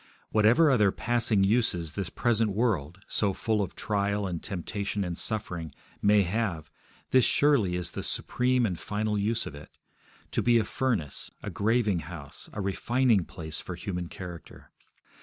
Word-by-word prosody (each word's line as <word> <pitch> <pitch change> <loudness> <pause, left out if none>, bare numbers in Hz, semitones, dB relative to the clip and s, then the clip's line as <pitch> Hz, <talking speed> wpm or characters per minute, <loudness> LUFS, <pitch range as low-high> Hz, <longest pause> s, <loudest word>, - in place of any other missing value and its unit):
Whatever 115 +9 +5
other 105 -6 +4
passing 115 -4 +1
uses 95 -7 +1
this 100 -4 -3
present 115 +3 +1
world, 95 - -1
so 100 -2 +1
full 110 +2 0
of 100 - -4
trial 100 -1 0
and 85 -3 -3
temptation 100 +2 -3
and 90 -2 -3
suffering, 90 - -4 0.3
may 105 0 +5
have, 90 -5 -2 0.4
this 130 -1 +6
surely 125 -13 +3
is 90 -1 -2
the - - -4
supreme 125 0 +1
and 90 -6 -2
final 105 0 -1
use 110 +3 0
of - - -7
it 70 +1 -13 0.5
to - - +1
be 120 -1 +4
a 115 - +3
furnace, 110 - -2
a - - -4
graving 105 -3 +1
house, 80 -3 -8
a 105 - -4
refining 110 +1 +2
place 80 -2 -5
for 90 - -6
human 90 -1 -4
character. 85 -3 -10
100 Hz, 160 wpm, -28 LUFS, 90-115 Hz, 0.5 s, this